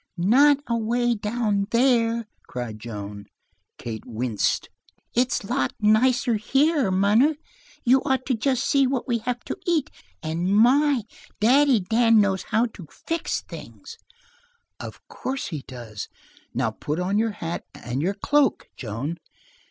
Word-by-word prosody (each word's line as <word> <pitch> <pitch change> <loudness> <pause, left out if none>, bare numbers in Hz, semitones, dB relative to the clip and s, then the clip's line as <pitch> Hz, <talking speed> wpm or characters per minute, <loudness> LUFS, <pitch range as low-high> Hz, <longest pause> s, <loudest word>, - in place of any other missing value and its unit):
"Not 265 +11 +5
away 235 +1 +1
down 210 -2 -1
there!" 235 -2 +2 0.2
cried 120 -3 -6
Joan. 105 -2 -7 0.5
Kate 110 -2 -6
winced. 115 -2 -1 0.5
"It's 245 -1 +1
lots 130 -9 -1
nicer 235 +3 +3
here, 275 +3 +2
munner. 210 +11 +3 0.5
You'd 260 +1 +4
ought 265 -2 0
to 265 - 0
just 250 +2 0
see 275 -2 +3
what 260 -1 -2
we 235 -2 +1
have 240 +2 -3
to - - -4
eat! 330 -5 +1 0.3
And 170 +5 0
my, 265 +2 +4 0.4
Daddy 260 +1 +4
Dan 225 +4 +4
knows 195 -2 +2
how 225 +2 +3
to 180 -6 -11
fix 330 0 -3
things." - - -11 0.8
"Of - - -9
course 265 0 -4
he 155 -7 -5
does. 120 -5 -8 0.4
Now - - -1
put 150 +3 -4
on 190 +3 0
your 225 -1 0
hat 170 -4 -5
and 120 +3 -4
your 190 +5 0
cloak, 280 +4 +1
Joan." 130 +9 -5
220 Hz, 135 wpm, -24 LUFS, 170-255 Hz, 0.8 s, Not